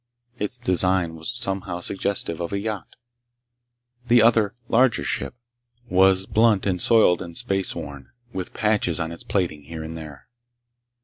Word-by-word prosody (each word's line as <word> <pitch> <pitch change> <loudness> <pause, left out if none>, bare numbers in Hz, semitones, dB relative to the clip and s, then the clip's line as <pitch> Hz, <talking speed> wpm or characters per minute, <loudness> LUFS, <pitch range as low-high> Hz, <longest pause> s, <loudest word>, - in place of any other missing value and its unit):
Its 105 +4 -3
design 90 -5 +1
was 80 0 -6
somehow 95 -6 -2
suggestive 95 -3 -2
of 85 - -4
a 100 - -1
yacht. 105 -3 -5 1.1
The 120 -2 +6
other, 110 -3 +3
larger, 125 +1 +3
ship 70 - -3 0.6
was 95 0 +4
blunt 110 -1 +3
and 90 -3 0
soiled 105 -7 +4
and 85 -2 -7
space 95 -1 -1
worn, 70 -2 -8 0.2
with 95 -1 -4
patches 105 -6 +1
on 80 0 -2
its 85 - -8
plating 85 -7 -2
here 80 +1 -7
and 80 +1 -7
there. 75 -3 -10
95 Hz, 145 wpm, -23 LUFS, 85-105 Hz, 1.1 s, The